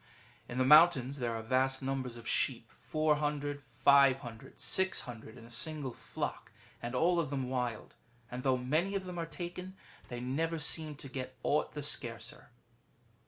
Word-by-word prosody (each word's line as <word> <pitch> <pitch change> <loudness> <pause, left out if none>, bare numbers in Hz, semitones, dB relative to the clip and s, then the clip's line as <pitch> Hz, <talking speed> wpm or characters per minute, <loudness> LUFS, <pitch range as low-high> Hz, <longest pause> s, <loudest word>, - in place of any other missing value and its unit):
^ - - -30 0.5
[In 120 - -5
the 130 - +3
mountains 145 -2 +6
there 120 -2 -1
are 110 - -4
vast 130 +3 +1
numbers 130 -3 -2
of 115 -1 -10
sheep - - +1
— - - -32
400, 150 -2 +1 0.2
500, 135 -4 +4
or - - -29
600 125 -11 -1
in 115 - -12
a - - -14
single 145 +2 -2
flock, - - -5 0.3
and 120 +2 -4
all 170 +6 +3
of 155 -5 -1
them 135 -2 -2
wild; 125 -4 -2 0.4
and 125 +1 -4
though 130 -1 +2
many 155 +10 0
of 190 -1 -2
them 180 -1 -5
are 165 - -2
taken, 180 +2 -6 0.3
they 120 - -5
never 160 +7 -1
seem 155 0 -1
to 140 - -7
get 130 -1 -6
aught 150 - +1
the 150 - -4
scarcer. 120 -5 -1
135 Hz, 175 wpm, -33 LUFS, 125-155 Hz, 0.5 s, mountains